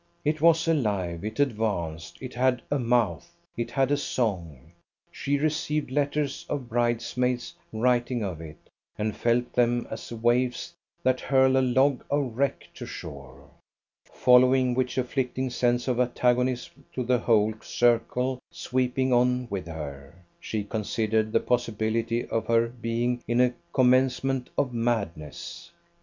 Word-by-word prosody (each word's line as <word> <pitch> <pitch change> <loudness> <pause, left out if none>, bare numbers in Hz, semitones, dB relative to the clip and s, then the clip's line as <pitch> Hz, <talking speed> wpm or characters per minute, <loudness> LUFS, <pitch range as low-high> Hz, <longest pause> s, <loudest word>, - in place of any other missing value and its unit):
It 150 0 0
was 165 0 +4
alive, 100 - 0
it 110 +3 -5
advanced, 100 - -1
it 130 -1 -7
had 125 -1 +1
a 145 - +2
mouth, 115 - +1 0.2
it 115 0 -3
had 135 +2 +1
a 145 - +3
song. 85 - -3 0.4
She 145 +1 -1
received 150 -1 -1
letters 145 0 -1
of 140 -4 -3
bridesmaids 120 +1 0 0.2
writing 120 +1 +1
of 90 -5 -4
it, 80 -1 -9 0.4
and 105 0 -2
felt 120 +2 0
them 120 0 +2
as - - -7
waves 120 +2 0 0.3
that 130 0 +2
hurl 130 -1 +3
a 130 - +4
log 130 +1 +2
of 140 -5 0
wreck 140 +2 -1
to - - -8
shore. 70 0 -9 0.6
Following 125 0 +4
which 125 0 -1
afflicting 130 0 -1
sense 120 0 +1
of 125 -1 0
antagonism 125 +2 0
to 125 - -1
the 125 0 +2
whole 110 -2 +3
circle 125 +2 +1
sweeping 130 0 0
on 125 +1 +3
with 95 -3 -3
her, 70 -3 -7 0.2
she 110 -2 -3
considered 110 +1 -1
the - - +3
possibility 115 -1 0
of 115 - -2
her 115 0 +3
being 120 +1 -2
in 120 +1 +1
a 125 0 +4 0.2
commencement 130 0 +2
of 130 -3 +1
madness. 100 -11 -3
120 Hz, 140 wpm, -26 LUFS, 110-130 Hz, 0.6 s, was